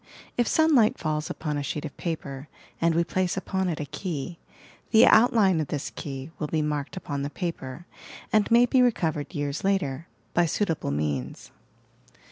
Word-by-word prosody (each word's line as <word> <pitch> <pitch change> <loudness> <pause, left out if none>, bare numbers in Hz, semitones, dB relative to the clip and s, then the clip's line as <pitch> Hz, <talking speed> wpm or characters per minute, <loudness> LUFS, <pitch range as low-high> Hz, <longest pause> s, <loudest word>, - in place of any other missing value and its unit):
If 240 -2 +1
sunlight 300 -9 +4
falls 155 -1 -2
upon 150 -2 -3
a - - -2
sheet 145 +2 -3
of 145 - -7
paper 145 -4 -5 0.3
and 165 -1 +3
we 170 - +3
place 185 +2 -1
upon 190 -1 -1
it 160 - -3
a 150 - -3
key, 165 +1 -5 0.5
the 220 -1 +7
outline 215 -7 +5
of 150 - -3
this 145 -1 -4
key 135 +1 -6
will 150 - -2
be 155 0 0
marked 150 +3 -3
upon 140 -6 -4
the 140 - -2
paper 165 -3 -5 0.5
and 215 -1 +3
may 235 +1 +6
be 255 +1 +3
recovered 165 -10 0
years 145 0 -2
later 170 -7 0 0.3
by 175 0 +3
suitable 165 - -1
means. 70 -3 -3
160 Hz, 170 wpm, -26 LUFS, 145-190 Hz, 0.5 s, the